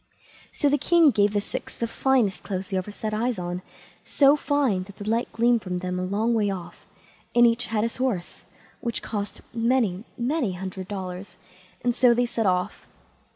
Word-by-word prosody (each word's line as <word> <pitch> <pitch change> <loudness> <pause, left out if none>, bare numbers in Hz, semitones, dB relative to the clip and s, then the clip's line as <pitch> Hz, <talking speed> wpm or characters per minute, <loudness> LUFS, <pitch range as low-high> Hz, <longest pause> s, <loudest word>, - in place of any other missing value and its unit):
So 290 - +1
the 290 0 +3
king 330 +1 +5
gave 205 -2 +2
the 205 - +2
six 200 - -6
the 235 - -1
finest 235 -4 +1
clothes 190 -1 -4
you 190 - 0
ever 185 - -6
set 215 +1 -4
eyes 235 +1 0
on, 180 0 -4 0.4
so 280 0 +5
fine 285 -10 +1
that 200 0 -13
the 205 - -8
light 230 +2 0
gleamed 235 0 +3
from 180 -2 -3
them 180 0 -3
a - - -2
long 210 +5 0
way 210 -3 +2
off, 185 -3 -7 0.5
and 240 0 +7
each 235 +1 +2
had 215 -1 0
his 230 - -2
horse, 240 -9 -2 0.3
which 235 - -3
cost 205 -2 -4
many, 230 -5 +1
many 245 - 0
hundred 185 0 -6
dollars, 190 -1 -6 0.5
and 245 -1 +1
so 245 -2 +5
they 245 +1 +2
set 230 -3 -1
off. 180 +1 -1
215 Hz, 190 wpm, -25 LUFS, 190-245 Hz, 0.5 s, and